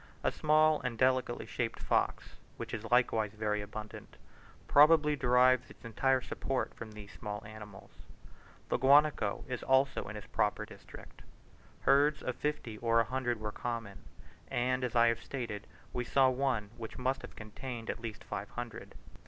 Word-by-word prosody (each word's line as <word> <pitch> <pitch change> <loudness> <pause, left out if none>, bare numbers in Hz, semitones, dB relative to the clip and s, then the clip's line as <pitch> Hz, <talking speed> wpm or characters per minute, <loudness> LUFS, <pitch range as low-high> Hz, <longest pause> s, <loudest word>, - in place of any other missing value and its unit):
A - - +2
small 155 0 +3
and 125 -3 -3
delicately 130 -1 +1
shaped - - -3
fox, - - -1 0.2
which - - -6
is 115 -1 -5
likewise 115 -4 +2
very 105 -1 -1
abundant, 105 +1 -9 0.5
probably 150 0 +6
derives 125 -1 +4
its - - -15
entire 130 +3 +1
support 135 +1 -3
from 110 -2 -9
these 105 -1 -10
small 105 0 -6
animals. 105 -2 -11 0.8
The - - +2
guanaco 140 -5 +4
is 125 -2 -4
also 130 +1 +2
in 100 - -7
his 105 - -7
proper - - 0
district, - - -13 0.6
herds 145 +2 +3
of 125 - -2
fifty 150 -8 -3
or 115 -1 +3
a - - +5
hundred 120 -1 -2
were 105 -1 -4
common; 115 -4 -5 0.5
and, 125 +1 0
as 125 -1 -2
I 120 0 +6
have 115 -1 +1
stated, 115 -6 -5 0.3
we 125 - -1
saw 130 +2 +4
one 125 -5 -1
which 115 -2 -7
must 130 +1 -1
have - - -10
contained 115 +2 -6
at - - -9
least 115 -3 -6
five 105 0 -5
hundred. 120 -2 -7
120 Hz, 160 wpm, -32 LUFS, 110-130 Hz, 0.8 s, probably